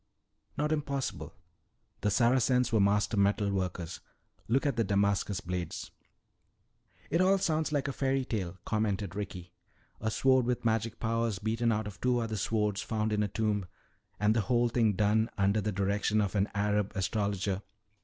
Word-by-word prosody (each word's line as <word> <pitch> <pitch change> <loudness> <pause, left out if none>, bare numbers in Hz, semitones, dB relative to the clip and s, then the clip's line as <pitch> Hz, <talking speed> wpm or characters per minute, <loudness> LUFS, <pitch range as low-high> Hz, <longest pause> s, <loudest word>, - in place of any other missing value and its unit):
"Not 150 +1 0
impossible. 140 -3 -3 0.7
The 105 - +2
Saracens 125 +2 +3
were 110 - +4
master 100 +2 +2
metal 100 +1 +2
workers. 90 -3 -3 0.5
Look 130 +6 +2
at 140 -4 +1
the 115 - +2
Damascus 100 -1 +1
blades." 90 -2 -4 1.2
"It 170 - +3
all 190 +1 +4
sounds 160 -4 0
like 145 -2 0
a 140 - -2
fairy 135 -1 0
tale," 95 -6 -3
commented 105 -4 -1
Ricky. 90 -4 -6 0.5
"A 110 - -1
sword 130 +2 +3
with 125 -1 -1
magic 115 0 0
powers 115 -2 0
beaten 115 +3 0
out 110 -1 0
of 100 -2 -9
two 125 -1 +2
other 115 -2 -2
swords 105 0 0
found 110 0 -1
in 105 - +1
a 105 - +1
tomb. 105 -2 -1 0.5
And 105 +1 +3
the 115 - +3
whole 120 +1 +2
thing 115 -3 +2
done 110 +3 +2
under 100 +2 +2
the 105 +1 -1
direction 100 +2 +1
of 100 -2 0
an 100 0 +1
Arab 105 0 0
astrologer." 100 0 -1
105 Hz, 165 wpm, -30 LUFS, 100-120 Hz, 1.2 s, were